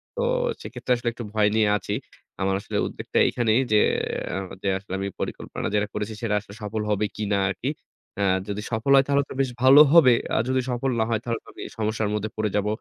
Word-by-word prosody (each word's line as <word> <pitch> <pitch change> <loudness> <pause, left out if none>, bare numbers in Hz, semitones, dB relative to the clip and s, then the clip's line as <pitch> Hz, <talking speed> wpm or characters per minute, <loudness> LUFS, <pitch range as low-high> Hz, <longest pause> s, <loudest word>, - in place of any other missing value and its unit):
তো - - -2 0.4
সেক্ষেত্রে - - -6
আসলে 120 0 -2
একটু 120 0 -7
ভয় 105 -1 +3
নিয়ে 110 -1 +3
আছি। - - -4 0.5
আমার 95 0 +1
আসলে - - -4
উদ্ভেক - - -7 0.2
এইখানেই 120 0 +2
যে 105 - +5 0.6
আ - - -1 0.3
যে 100 - +1
আসলে 95 0 -9
আমি 100 - -2
পরিকল্পনা - - -4
যেটা 105 0 +1
করেছি 105 +1 -3
সেটা 110 -3 0
আসলে 100 -1 -14
সফল 105 +1 -3
হবে 105 0 +1
কিনা 105 -2 -1
আরকি। 125 +7 -3 0.5
এ্যা 100 - +2 0.2
যদি 105 +1 -3
সফল 115 +4 0
হয় 135 0 +5
তাহলে 140 0 +2
তো - - -6
বেশ 130 - 0
ভালো 135 +3 +9
হবে। 140 -8 +8 0.2
আর - - +3
যদি 130 0 +2
সফল 125 +2 -1
না - - +3
হয় 115 - +1
তাহলে 115 -1 -2
আমি - - -11 0.2
সমস্যার 110 -1 -1
মধ্যে 105 0 -2
পড়ে 110 -1 0
যাব। 105 0 +1
110 Hz, 210 wpm, -24 LUFS, 105-120 Hz, 0.6 s, ভালো